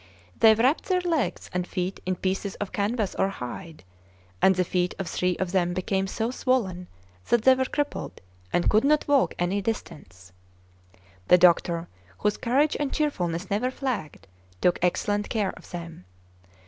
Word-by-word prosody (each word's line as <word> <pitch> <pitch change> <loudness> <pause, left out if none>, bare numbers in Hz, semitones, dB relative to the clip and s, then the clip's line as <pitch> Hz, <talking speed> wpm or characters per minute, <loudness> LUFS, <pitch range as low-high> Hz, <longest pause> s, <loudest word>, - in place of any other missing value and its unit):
They 220 -1 +7
wrapped 255 +7 +2
their 365 -1 +1
legs 330 -7 -1
and 180 0 -1
feet 185 0 -3
in 185 - +1
pieces 190 +2 -2
of 205 - -5
canvas 210 0 -1
or 195 - +1
hide; 160 - -8 0.6
and 190 - +5
the 185 - +2
feet 180 0 -1
of 195 - -4
three 180 -1 0
of 185 -2 -2
them 175 -2 +1
became 190 +1 -1
so 225 +4 -2
swollen 195 -9 -1 0.4
that 235 -2 +3
they 260 - +7
were 260 0 0
crippled 290 +2 -3 0.3
and 175 - +1
could 215 +1 +4
not 300 +2 +2
walk 285 -2 +3
any 180 +3 0
distance. 95 - -6 0.9
The 180 - +7
doctor, 170 -1 +3 0.3
whose 210 - 0
courage 275 +5 +2
and 290 -2 -1
cheerfulness 185 - -2
never 220 +6 +1
flagged, 245 - -4 0.3
took 175 - +2
excellent 205 +3 0
care 210 -4 -1
of - - -15
them. 170 - -8
195 Hz, 160 wpm, -26 LUFS, 180-245 Hz, 0.9 s, They